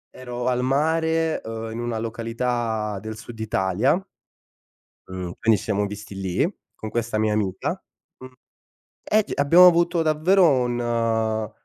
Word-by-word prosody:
Ero 125 -1 -6
al 125 0 +1
mare, 160 +4 +1
uhm, 115 0 -6
in 115 - -6
una 120 -1 -3
località 115 -2 -2
del 110 0 -7
sud 115 0 -11
Italia 110 - +1 1.1
mhmm, 90 -2 -6
quindi 115 -1 +3
ci - - -9
siamo 105 -1 0
visti 105 0 -8
lì, 95 - 0 0.3
con 110 - -7
questa 115 -1 -2
mia 110 0 +1
amica, 95 -3 -1 0.5
mhmm, 130 0 -11 0.7
e 215 0 +2
c - - -10
abbiamo 170 +6 +7
avuto 170 0 +3
davvero 165 +3 +4
un 115 -4 0
115 Hz, 140 wpm, -23 LUFS, 110-140 Hz, 1.1 s, abbiamo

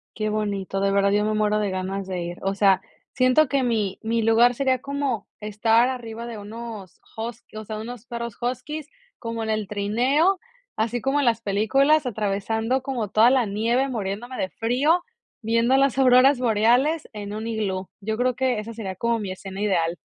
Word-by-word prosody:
Qué 215 -1 -1
bonito, 200 -2 -2
de 195 0 +1
verdad 200 0 +3
yo 210 +1 +2
me 215 - 0
muero 210 0 +1
de 205 -2 0
ganas 190 +1 -3
de 185 -2 -4
ir. 175 +1 -5
O 195 +1 0
sea, 195 -2 +3 0.3
siento 255 +4 +4
que 265 0 +1
mi 215 -5 0
mi 230 +1 0
lugar 225 +2 +5
sería 260 0 +1
como 275 -5 -3
estar 225 +3 +2
arriba 235 -2 -6
de 230 - -6
unos 215 -2 -9 0.2
hus 230 +1 -5
o 215 - -6
sea, 215 0 -5
unos 240 +1 -8
perros 235 -2 -5
huskies, 275 +5 -4 0.3
como 230 -1 -5
en 220 - -4
el 215 -2 -1
trineo, 250 - +1 0.4
así 230 +2 -1
como 270 +4 +1
en 285 - +1
las 230 -1 +2
películas, 270 +9 +2
atravesando 220 +3 -1
como 245 -6 -3
toda 225 +4 +5
la 255 -4 +2
nieve, 230 +6 +1
muriéndome 230 +2 -4
de 190 - -2
frío, 275 +10 +1 0.4
viendo 230 +4 +2
las 275 -2 +2
auroras 260 +1 +6
boreales 245 +7 +2
en 205 -1 -6
un 220 +2 -4
iglú. 195 -4 -2
Yo 220 +2 -3
creo 250 +2 +1
que 255 -3 0
esa 225 +2 -6
sería 200 -4 -5
como 235 +4 0
mi 205 -4 -4
escena 190 +1 -7
ideal. 175 -5 +1
225 Hz, 190 wpm, -24 LUFS, 205-250 Hz, 0.4 s, auroras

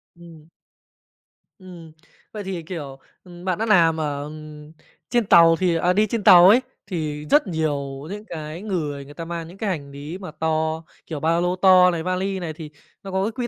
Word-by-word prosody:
Ừm. 165 -2 -15 1.1
Ừm. 175 -4 -13 0.4
Vậy 210 -1 -6
thì, 190 -3 -5
kiểu, 145 -6 -7 0.2
ừm, 175 0 -13
bạn 185 -2 0
đã 225 - -1
làm 165 -7 +4
ở, 145 -2 -3
ừm, 150 0 -10 0.4
trên 240 -2 +1
tàu 165 -3 +6
thì 175 -1 0
à, 175 +2 +2
đi 210 +3 +2
trên 220 -1 -3
tàu 180 +1 +8
ấy, 240 +5 +6 0.2
thì 155 -6 -4
rất 295 - +3
nhiều 145 -4 -3
những 210 +2 -7
cái 160 -1 -7
người 150 -9 -4
người 145 - -13
ta 165 +3 -7
mang 165 -1 -5
những 180 +3 -13
cái 215 -1 -2
hành 145 -6 -4
lý 145 +5 -8
mà 185 -4 -9
to, 160 0 -2 0.2
kiểu, 155 -3 -6
ba 165 +3 +1
lô 175 +1 0
to 185 -1 +6
này, 165 -2 -3
vali 190 +2 -2
này 170 -3 -5
thì 155 -1 -9 0.3
nó 195 - -7
có 190 0 0
cái 220 - -1
quy 240 +1 -4
170 Hz, 205 wpm, -22 LUFS, 155-185 Hz, 1.1 s, tàu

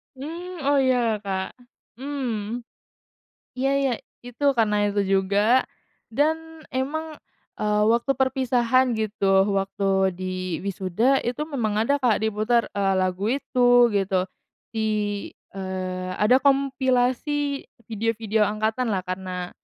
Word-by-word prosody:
Mmm, 335 +4 -7
oh 285 0 +3
ya 245 -5 +2
Kak, 195 +2 -4 0.4
mmm, 245 -5 -3 1.0
iya 270 +1 +1
iya 275 -2 +1 0.3
itu 245 +3 -7
karena 210 -3 +2
itu 205 0 +1
juga, 200 +5 +2 0.5
dan 320 +3 -1
emang, 305 +4 -3 0.4
eee, 210 0 +1
waktu 235 +4 +2
perpisahan 255 -1 +2
gitu 200 -2 +2
waktu 195 -1 +1
di 185 -1 -4
wisuda 200 +7 +1
itu 245 +4 -2
memang 255 -9 -2
ada 280 +5 +1
Kak 245 -6 +1
diputar, 220 +2 +1
eee, 195 -1 +1
lagu 185 +1 0
itu 245 -1 +4
gitu, 195 -2 +1 0.5
di 220 -1 -1 0.6
eee, 185 -1 -4
ada 215 +7 +4
kompilasi 275 +1 +1 0.2
video-video 220 -1 0
angkatanlah 215 -1 -1
karena, 185 -1 -5
225 Hz, 110 wpm, -24 LUFS, 195-265 Hz, 1.0 s, itu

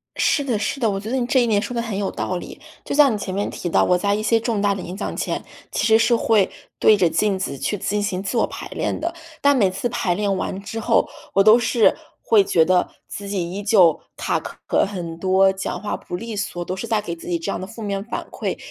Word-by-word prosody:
是 290 - +2
的 245 -6 -1
是 250 - -2
的， 230 -4 +2
我 195 - -2
觉 215 - -7
得 255 - -1
你 250 - 0
这 255 +1 +3
一 240 - +2
点 210 -3 +2
说 245 - -5
得 235 - -1
很 225 -4 -4
有 200 -1 -1
道 185 - -3
理。 - - -9 0.2
就 - - -4
像 280 -4 +5
你 - - -1
前 190 -2 -5
面 200 +2 -1
提 175 - -4
到， - - +3
我 180 - +3
在 200 +2 +1
一 210 - 0
些 225 +1 +3
重 225 -2 -1
大 200 -1 +2
的 195 - -5
演 180 +1 -7
讲 200 - -4
前， - - -2 0.3
其 - - 0
实 220 - +6
是 230 +1 +3
会 220 -4 +3 0.3
对 215 - +6
着 175 -4 +3
镜 195 +4 +1
子 140 -7 -3
去 205 - -2
进 200 +2 -1
行 195 -3 -2
自 200 +5 -2
我 - - +3
排 - - -7
练 - - -2
的， 335 +2 -2 0.3
但 285 0 +5
每 200 -7 +3
次 195 +6 -2
排 180 -5 0
练 200 +1 0
完 190 +1 -3
之 225 +3 -6
后， 230 0 +2 0.3
我 195 - +5
都 215 +3 +8
是 235 -1 +3 0.3
会 215 -3 +4
觉 165 -4 +3
得 180 +1 +2 0.2
自 200 0 -7
己 180 -4 -2
依 200 +2 -5
旧 190 -6 +4 0.2
卡 - - 0
壳 - - -1
很 175 -5 -6
多， 190 +2 +4
讲 190 0 -4
话 205 - -2
不 175 - -6
利 230 +3 -6
索， 200 -4 -3
都 185 - -3
是 190 - -5
在 220 -2 0
给 170 -5 -5
自 165 - -12
己 170 -1 0
这 165 - -4
样 - - -2
的 185 - -5
负 210 +4 -10
面 200 -2 -2
反 235 - -5
馈。 - - -3
205 Hz, 290 characters per minute, -22 LUFS, 185-225 Hz, 0.3 s, 都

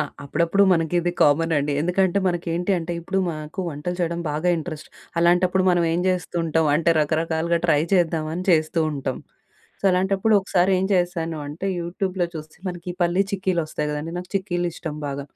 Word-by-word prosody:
ఆ! - - +3 0.2
అప్పుడప్పుడు 170 +7 +2
మనకిది 175 +1 +1
కామనండి. 150 -1 +3
ఎందుకంటే 180 +3 +2
మనకేంటి 175 +1 -1
అంటే 170 +1 -4
ఇప్పుడు 190 +3 -2
మాకు 155 +3 -6
వంటలు 160 +4 -4
చేయడం 170 0 -1
బాగా 155 +4 -1
ఇంట్రెస్ట్. 155 -1 -6 0.3
అలాంటప్పుడు 180 +2 +3
మనం 175 -1 +2
ఏం 170 - +1
జేస్తూంటాం, 165 -3 0
అంటే 170 +2 +2
రకరకాలుగా 160 +2 0
ట్రై 150 -3 +3
చేద్దామని 165 -1 +1
చేస్తూ 160 0 +2
ఉంటాం. 135 -3 -3 0.6
సో, - - -13
అలాంటప్పుడు 190 +4 +2
ఒకసారేం 185 0 +2
చేశాను 175 -3 0
అంటే 150 +7 -5
యూటూబ్‌‌లో 180 +1 -2
చూసి 155 0 -8
మనకి 175 -1 -7
ఈ - - -13
పల్లి 175 +2 +2
చిక్కీలొస్తాయి 170 -6 -1
గదండీ! 150 +2 -4
నాకు 180 0 -8
చిక్కీలిష్టం 175 -5 -2
బాగా. 140 0 -4
170 Hz, 150 wpm, -23 LUFS, 155-180 Hz, 0.6 s, ఆ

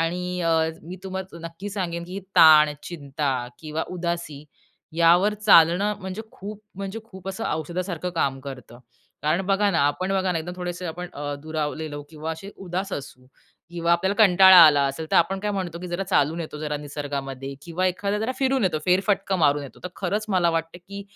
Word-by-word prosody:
आणि 180 +2 -2
अ, 165 -1 +2 0.3
मी 180 +3 -8
तुम्हाला 190 -2 -6
नक्की 165 +5 -8
सांगेन, 170 -4 -3
की 185 +3 -6 0.2
ताण, 155 -3 +8
चिंता 145 -3 -3 0.3
किंवा 155 0 -4
उदासी 170 -5 -4 0.5
यावर 175 +5 +4
चालणं 200 -1 +5
म्हणजे 190 +3 -5
खूप, 210 +2 -9
म्हणजे 195 +3 -5
खूप 190 -4 -10
असं 195 +4 -4
औषधासारखं 175 +3 -3
काम 135 -4 0
करतं. 125 -3 -10 0.4
कारण 155 +4 +1
बघा 200 +1 +2
ना 165 - +1
आपण 185 +6 -1
बघा 190 -1 +1
ना 165 - -1
एकदम 175 +3 -6
थोडेसे 180 0 -5
आपण 175 +2 -5
अ, 145 0 -4
दुरावलेलो 155 -1 -4
किंवा 160 +1 -5
असे 180 +5 -9
उदास 185 +2 -3
असू 130 -2 -7 0.4
किंवा 170 0 0
आपल्याला 190 +3 +1
कंटाळा 190 0 +8
आला 145 -2 +5
असेल 150 +4 -4
तर - - +3
आपण 190 +3 +3
काय 210 +1 -1
म्हणतो, 185 -4 -3
की 180 - -6
जरा 175 +3 -2
चालून 165 -3 +1
येतो 155 -2 -6
जरा 150 -1 -3
निसर्गामध्ये 140 -2 -5
किंवा 175 +2 -1
एखादा 200 +3 -1
जरा 220 +4 -1
फिरून 265 -3 +1
येतो. 175 -4 +1
फेरफटका 195 +1 +2
मारून 145 -3 +3
येतो. 140 - -11
तर - - -2
खरंच 200 +3 -2
मला 180 -4 +2
वाटतं 165 +1 -3
की 200 0 -7
175 Hz, 180 wpm, -24 LUFS, 155-190 Hz, 0.5 s, ताण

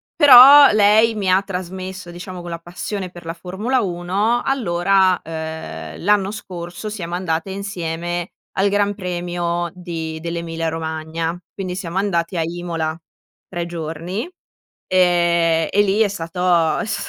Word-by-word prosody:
Però 280 -1 +10
lei 215 +2 +4
mi 200 -3 -1
ha 185 +1 +4
trasmesso 185 -1 -6
diciamo 180 +1 -8
quella 170 -1 -6
passione 180 +3 -5
per 175 -1 -13
la 165 - -4
Formula 195 +9 -2
1. 195 +5 0
Allora, 190 -6 +2
uhm, 160 - -7
l'anno 200 0 +2
scorso 180 -1 -7
siamo 175 -5 -5
andate 175 0 -2
insieme 175 -3 -4 0.3
al 195 +1 +3
Gran 205 0 +1
Premio 175 -2 -3
di 165 -3 -6
dell'Emilia 165 0 -4
Romagna. 160 +1 -3 0.2
Quindi 185 -2 -5
siamo 180 -1 -5
andati 185 -3 0
a - - +1
Imola 165 -1 -3 0.5
3 175 -2 -4
giorni, 170 - -5 0.6
ehm, 170 -2 +2
e 205 - +2
lì 205 +1 +1
è 220 - +4
stato 175 -3 0
è - - -2
stato 215 - -3
175 Hz, 135 wpm, -20 LUFS, 170-195 Hz, 0.6 s, Però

